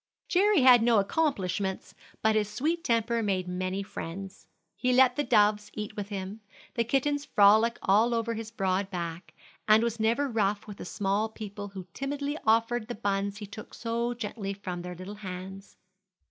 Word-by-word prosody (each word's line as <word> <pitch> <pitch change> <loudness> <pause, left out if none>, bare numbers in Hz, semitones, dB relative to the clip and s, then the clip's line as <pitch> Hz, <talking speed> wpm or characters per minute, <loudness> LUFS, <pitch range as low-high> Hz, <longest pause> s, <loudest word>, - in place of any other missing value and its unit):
Jerry 390 -2 +4
had 250 -2 +8
no 230 -1 +4
accomplishments, 195 - -1 0.3
but 220 0 +4
his 210 -1 +1
sweet 310 +10 -1
temper 230 0 +1
made 190 -4 -1
many 185 +2 -2
friends. 190 +1 -8 0.3
He 250 0 +1
let 255 0 +5
the 295 - 0
doves 210 -3 +3
eat 210 -1 -5
with 205 -1 -5
him, 200 +1 -5 0.3
the 235 - +1
kittens 280 +4 0
frolic 220 0 +5
all 225 +5 +4
over 230 0 -1
his 225 -1 -5
broad 195 -3 -1
back, 170 -1 -6 0.3
and 215 +1 +6
was 230 -1 -1
never 230 +6 +2
rough 205 -4 0
with 205 -2 -9
the - - -7
small 205 +4 -1
people 205 -2 -7
who 190 -2 -8
timidly 285 +1 -3
offered 230 +1 +2
the 240 - -5
buns 200 -1 -1
he 210 - -6
took 205 +2 -10
so 235 +1 -2
gently 210 -3 -4
from 180 -3 -5
their 180 0 -7
little 185 +4 -8
hands. 190 +1 -8
215 Hz, 175 wpm, -28 LUFS, 195-235 Hz, 0.3 s, had